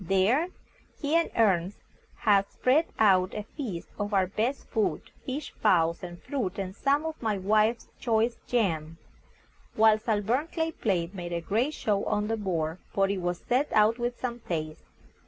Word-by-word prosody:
There 195 Hz, -, +2 dB, 0.5 s
he 295 Hz, +2 st, 0 dB
and 335 Hz, 0 st, +3 dB
Ernest 195 Hz, -4 st, +2 dB, 0.4 s
had 200 Hz, -2 st, +3 dB
spread 290 Hz, +6 st, +2 dB
out 185 Hz, -3 st, +4 dB
a 210 Hz, -, -3 dB
feast 210 Hz, -, -6 dB
of 205 Hz, 0 st, -1 dB
our 190 Hz, -1 st, +4 dB
best 225 Hz, +8 st, -2 dB
food 220 Hz, -3 st, 0 dB, 0.2 s
fish, 275 Hz, +4 st, -4 dB
fowls, 170 Hz, -5 st, +3 dB
and 175 Hz, -1 st, -8 dB
fruit, 220 Hz, -10 st, -3 dB
and 190 Hz, -1 st, -4 dB
some 285 Hz, +5 st, +1 dB
of 320 Hz, -1 st, -5 dB
my 220 Hz, -3 st, 0 dB
wife's 215 Hz, +4 st, +2 dB
choice 230 Hz, 0 st, +1 dB
jam 165 Hz, -9 st, 0 dB, 0.8 s
whilst 220 Hz, +1 st, +4 dB
our 215 Hz, -2 st, +3 dB
burnt 260 Hz, -, 0 dB
clay 325 Hz, -1 st, 0 dB
plate 185 Hz, -, -1 dB
made 175 Hz, -3 st, -5 dB
a 170 Hz, -, 0 dB
great 230 Hz, -, 0 dB
show 205 Hz, -2 st, 0 dB
on 210 Hz, +1 st, 0 dB
the 225 Hz, -, 0 dB
board, 170 Hz, -5 st, -2 dB
for 195 Hz, -1 st, +2 dB
it 195 Hz, -2 st, -2 dB
was 175 Hz, 0 st, -3 dB
set 260 Hz, +4 st, +1 dB
out 220 Hz, +2 st, +4 dB
with 240 Hz, 0 st, -2 dB
some 240 Hz, -1 st, -3 dB
taste. 155 Hz, -6 st, -4 dB
210 Hz, 175 wpm, -28 LUFS, 185-240 Hz, 0.8 s, out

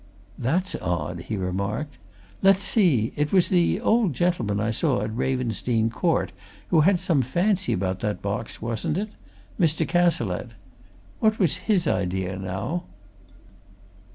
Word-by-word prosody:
"That's 165 Hz, +10 st, 0 dB
odd!" 85 Hz, -1 st, -3 dB
he 110 Hz, -, -2 dB
remarked. 100 Hz, +10 st, -3 dB, 0.4 s
"Let's 195 Hz, 0 st, +5 dB
see 165 Hz, -, +2 dB
it 150 Hz, 0 st, 0 dB
was 185 Hz, -3 st, +4 dB
the 180 Hz, 0 st, +3 dB
old 225 Hz, -, +2 dB
gentleman 120 Hz, -, 0 dB
I 105 Hz, +2 st, 0 dB
saw 105 Hz, -2 st, 0 dB
at 110 Hz, 0 st, -4 dB
Ravensdene 120 Hz, -3 st, 0 dB
Court 165 Hz, -, 0 dB, 0.4 s
who 160 Hz, -, +5 dB
had 180 Hz, +3 st, +4 dB
some 160 Hz, -6 st, +2 dB
fancy 185 Hz, -, +1 dB
about 95 Hz, 0 st, -1 dB
that 105 Hz, -2 st, -2 dB
box, 100 Hz, +2 st, -4 dB
wasn't 115 Hz, +7 st, -1 dB
it? 210 Hz, +2 st, -2 dB, 0.5 s
Mr. 160 Hz, -2 st, +2 dB
Cazalette. 120 Hz, -, +1 dB, 0.7 s
What 220 Hz, -1 st, +3 dB
was 180 Hz, -7 st, +2 dB
his 190 Hz, -5 st, +3 dB
idea, 95 Hz, -3 st, -1 dB
now?" 95 Hz, -, -3 dB
130 Hz, 135 wpm, -25 LUFS, -, 0.7 s, Let's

